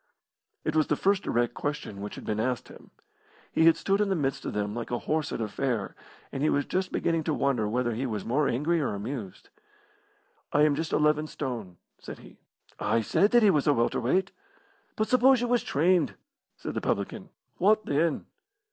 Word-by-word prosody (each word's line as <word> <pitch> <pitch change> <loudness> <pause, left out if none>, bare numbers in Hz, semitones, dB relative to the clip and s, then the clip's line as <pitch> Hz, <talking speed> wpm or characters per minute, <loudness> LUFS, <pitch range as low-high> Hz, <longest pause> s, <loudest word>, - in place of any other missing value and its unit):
It 155 - -1
was 155 -1 +3
the 150 - +2
first 195 +5 +2
direct 120 - 0
question 145 -9 -4
which 105 - -6
had - - -9
been 105 0 -2
asked 125 +2 -1
him. - - -14 0.6
He 160 - +3
had 165 - +6
stood 195 +1 +1
in 205 - +1
the 190 - +1
midst 135 -5 -2
of - - -3
them 105 0 -2
like 120 +1 -5
a 120 - -1
horse 155 +3 -2
at - - -3
a 110 - -1
fair, 115 -1 -2 0.4
and 135 - -4
he 155 - +3
was 145 - +1
just 185 0 -2
beginning 165 -1 0
to 155 - 0
wonder 125 -6 +1
whether 120 +1 0
he 130 +4 -2
was 105 -4 -4
more 140 +5 +1
angry 155 +7 +1
or 130 - -1
amused. 105 -1 -6 1.0
"I 150 - +4
am 150 -1 +4
just 160 +2 -3
eleven 150 0 +2
stone," 115 - -5 0.2
said - - -9
he. - - -16 0.4
"I 115 - +1
said 165 - +2
that 240 0 +5
he 205 - +6
was 150 -4 +1
a 145 - +6
welter 115 0 +1
weight." 185 +10 +1 0.6
"But 215 - 0
suppose 255 +1 +5
you 245 - -1
was 245 0 +2
trained?" 170 +3 +2 0.4
said - - -5
the - - -2
publican. - - -2 0.3
"Wot 215 +3 +3
then?" 150 +2 0
145 Hz, 205 wpm, -28 LUFS, 120-170 Hz, 1.0 s, had